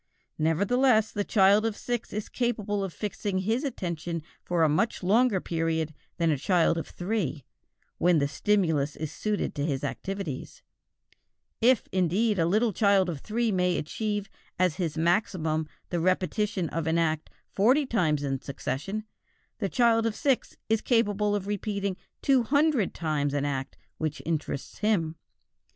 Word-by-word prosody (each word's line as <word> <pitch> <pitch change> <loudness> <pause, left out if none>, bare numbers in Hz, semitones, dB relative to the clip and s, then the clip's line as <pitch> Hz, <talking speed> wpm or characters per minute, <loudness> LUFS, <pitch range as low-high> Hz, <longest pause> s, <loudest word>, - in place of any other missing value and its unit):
Nevertheless 215 - +3
the 205 - -1
child 200 +1 +4
of 225 -2 -1
six 240 -1 -3
is 210 0 -4
capable 210 -5 -1
of 190 - -3
fixing 205 0 -3
his 220 +8 0
attention 170 - -3 0.2
for 175 -2 +1
a - - +6
much 170 +8 0
longer 215 +2 +3
period 160 -2 -1 0.2
than 165 -2 +2
a 145 - 0
child 170 +1 +3
of - - -6
three, 175 - -3 0.5
when 175 -1 +4
the 140 -2 +2
stimulus 155 -3 +1
is 155 -1 -5
suited 210 -1 -2
to 145 - -2
his 140 -3 -1
activities; 190 -9 -5 1.0
if, 245 0 +5
indeed, 190 +4 +1
a 165 - +3
little 215 +4 +2
child 200 -2 +3
of 160 -5 -4
three 225 - -1
may 180 -2 +1
achieve 205 +5 -2 0.3
as 180 -3 +2
his 165 -5 -2
maximum 160 -3 +1 0.2
the 175 - -1
repetition 185 +2 0
of 165 0 -3
an 160 +1 +2
act 160 -2 0 0.2
forty 255 +9 +3
times 160 - +1
in 135 -2 -2
succession, 140 +10 -4 0.6
the 200 -4 -1
child 230 -1 +3
of 220 - -2
six 270 -3 0
is 220 -1 +2
capable 210 -3 +2
of 200 -2 -2
repeating 200 -1 -2 0.3
two 270 -2 +4
hundred 285 -2 +2
times 145 -3 -1
an 145 0 0
act 135 -1 -3 0.2
which 155 -1 -2
interests 155 -4 -3
him. 175 -7 +1
190 Hz, 155 wpm, -27 LUFS, 160-215 Hz, 1.0 s, a